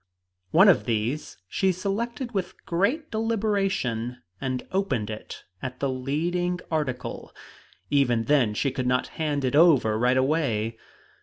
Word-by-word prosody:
One 185 +6 +6
of 170 - +5
these 115 +5 -2
she 190 - +1
selected 235 +7 -3
with 195 -5 -4
great 230 - 0
deliberation, 195 - 0 0.2
and 130 -1 -2
opened 135 - 0
it 110 - -8 0.2
at 130 -1 -5
the 140 - 0
leading 170 +8 -1
article. 145 -6 -3 0.6
Even 125 -5 +3
then 120 -5 +2
she 135 +4 0
would 130 -1 -1
not 125 0 +1
hand 145 -3 0
it 130 - 0
over 140 -10 +5
right 125 +2 +3
away. 125 -6 0
145 Hz, 135 wpm, -26 LUFS, 125-190 Hz, 0.6 s, One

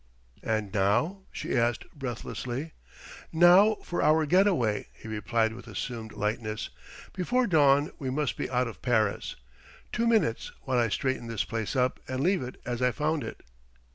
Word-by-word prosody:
"And 110 -3 -2
now...?" 120 - +1
she - - -3
asked 120 -1 +1
breathlessly. 130 +2 -5 0.6
"Now 180 +6 +6
for 175 - -2
our 155 +1 +4
get 185 +6 +4
away," 115 - +1
he - - -12
replied 110 +1 0
with 120 - -11
assumed 110 +1 -5
lightness. 110 +1 -3 0.4
"Before 245 +7 +1
dawn 145 -6 +4
we 135 -4 -3
must 140 -1 -1
be - - -3
out 125 0 +1
of 115 - -9
Paris.... 110 -5 0 0.6
Two 235 0 0
minutes, 220 - +1
while 130 -2 +1
I 115 -1 +2
straighten 130 +3 -1
this 115 -3 -1
place 115 0 -3
up 130 0 +1
and 130 +1 -2
leave 185 +1 +2
it 125 0 -7
as 120 0 -3
I 125 - +4
found 150 +2 -1
it." 115 - -7
125 Hz, 165 wpm, -28 LUFS, 115-160 Hz, 0.6 s, Now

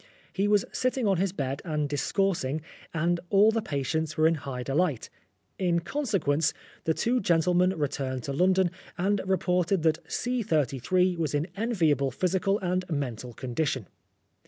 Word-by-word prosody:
He 200 +1 +1
was 205 -1 +3
sitting 255 -1 0
on 195 -2 +3
his 190 +1 +1
bed 140 -6 -3
and 150 -4 -1
discoursing, 155 0 0 0.3
and 170 +2 +1
all 205 +2 +6
the 225 0 0
patients 155 -1 -2
were 155 - +4
in 165 - +5
high 135 -5 -5
delight. 145 -1 0 0.5
In 175 -3 +2
consequence, 170 - 0 0.3
the 160 - +2
two 250 +2 +1
gentlemen 180 +1 +2
returned 135 -4 -2
to 140 - -3
London, 185 +3 +3 0.3
and 200 +3 +1
reported 180 -1 +1
that 160 -1 +2
.33 180 - +1
was 150 -3 0
in 145 +2 +1
enviable 170 - +1
physical 190 - +1
and 185 0 0
mental 125 -6 -3
condition. 130 0 -2
165 Hz, 145 wpm, -28 LUFS, 145-190 Hz, 0.5 s, all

